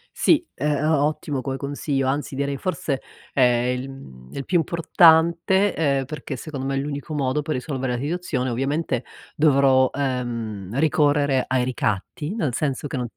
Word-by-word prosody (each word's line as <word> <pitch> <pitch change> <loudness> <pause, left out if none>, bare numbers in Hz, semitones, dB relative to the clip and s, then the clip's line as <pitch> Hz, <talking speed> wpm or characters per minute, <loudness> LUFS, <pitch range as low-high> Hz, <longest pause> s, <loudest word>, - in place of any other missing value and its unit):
Sì, 320 +1 +3
ehm, 150 0 0
è 150 - -1
o 150 -2 +3
ottimo 150 -2 -2
come 135 0 -3
consiglio, 140 -1 -2
anzi 140 +1 -2
direi 140 0 -1
forse, 140 -5 -2 0.3
ehm, 125 -1 +2
il 130 +2 -6
uhm, 65 - -12
il 140 - -5
più 180 - +2
importante, 170 +3 +4
ehm, 140 -4 +1
perché 140 0 -6
secondo 135 0 -6
me 135 0 -1
è - - 0
l'unico 145 +2 -4
modo 140 0 0
per 155 +1 -3
risolvere 130 -1 -3
la 120 - -2
situazione, 145 -3 -2
ovviamente, 135 +1 -1 0.3
dovrò, 135 -3 +4
ehm, 120 -6 -3
ricorrere 145 -3 +3
ai 130 -1 +1
ricatti 125 - -2
nel 155 - -1
senso 145 -1 -1
che 135 - -4
non 125 -1 -2
140 Hz, 170 wpm, -23 LUFS, 130-150 Hz, 0.3 s, importante